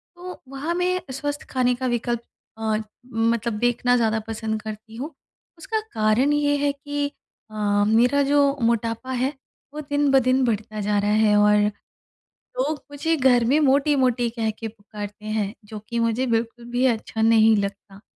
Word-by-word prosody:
तो 360 +1 -9
वहाँ 275 +5 -3
मैं 365 +1 0
स्वस्थ 290 +2 -4
खाने 250 -1 +2
का 260 +1 -4
विकल्प 240 -1 -1 0.4
अ, 220 -1 -1 0.4
मतलब 230 0 +1
देखना 245 +1 +2
ज़्यादा 220 -2 +1
पसंद 220 -1 -3
करती 220 +1 -8
हूँ। 285 +7 -6 0.4
उसका 440 +7 -2
कारण 220 +6 +2
ये 290 0 +2
है 285 - +3
कि 290 0 -3 0.4
अ, - - -11 0.3
मेरा 245 +6 +4
जो 280 0 +3
मोटापा 230 +2 0
है, 260 +2 0 0.4
वो 300 - -5
दिन 290 -1 0
ब 270 - +6
दिन 255 +1 +3
बढ़ता 215 -2 -2
जा 205 0 0
रहा 205 +1 +1
है, 215 0 +4
और 210 0 +5 1.0
लोग 290 +3 -1
मुझे 325 +3 0
घर 255 -4 +4
में 270 +6 +3
मोटी-मोटी 265 -4 +2
कह 225 -1 -1
के 225 +1 -6
पुकारते 210 -1 -9
हैं, 215 -1 -2
जो 215 +1 -8
कि 235 - -2
मुझे 230 +3 +1
बिल्कुल 230 0 -1
भी 245 +2 0
अच्छा 225 -2 -1
नहीं 225 -1 +5
लगता। 200 0 -5
235 Hz, 165 wpm, -23 LUFS, 220-280 Hz, 1.0 s, ब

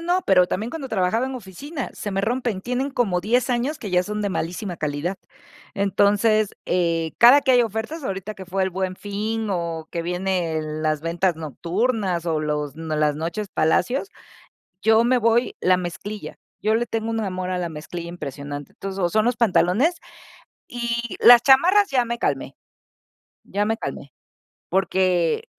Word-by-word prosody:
no. 370 - +1
Pero 180 -2 +5
también 220 +7 -3
cuando 285 -3 -6
trabajaba 220 +4 +1
en 265 - -5
oficina, 255 - -6
se 205 - -5
me 195 - 0
rompen. 230 -2 -1
Tienen 250 +5 -2
como 205 -9 0
10 240 +6 +1
años 250 +5 -1
que 205 - -6
ya 180 0 +3
son 210 +2 -4
de 205 - 0
malísima 180 +1 -3
calidad. 155 +5 -2 0.6
Entonces, 205 +2 +2 0.2
eh, 165 -2 0
cada 250 +5 +8
que 265 -1 +2
hay 245 -1 +6
ofertas, 230 +8 -4
ahorita 195 +1 -4
que 190 -2 -10
fue 190 +1 -1
El 190 - 0
Buen 185 0 -3
Fin 215 +2 -3
o 165 -3 -3
que 170 -1 -3
vienen 170 -4 -2
las 155 -1 0
ventas 170 +1 0
nocturnas 180 - -1
o 160 -2 0
los 150 -1 -2
las 155 -2 0
Noches 170 +6 -4
Palacio, 180 - +1 0.8
yo 220 +1 +5
me 250 +1 +3
voy 230 +2 +2
la 185 0 +4
mezclilla. 185 +4 -6 0.3
Yo 215 +1 +2
le 240 +1 +1
tengo 225 0 -3
un 225 - -1
amor 185 -3 -3
a 185 - -1
la 175 -1 -2
mezclilla 165 +2 -7
impresionante. 145 -3 -7
Entonces, 195 0 -6
o 175 -2 +2
son 215 +5 +2
los 245 -1 +1
pantalones, 230 - +3 0.8
y 235 -1 -3
las 240 -1 +9
chamarras 360 +10 +5
ya 250 -3 +2
me 235 0 -3
calmé. 135 -5 -2 0.9
Ya 205 +2 -1
me 220 +1 0
calmé, 140 - -6 0.6
porque, 185 - +1
195 Hz, 170 wpm, -23 LUFS, 170-235 Hz, 0.9 s, las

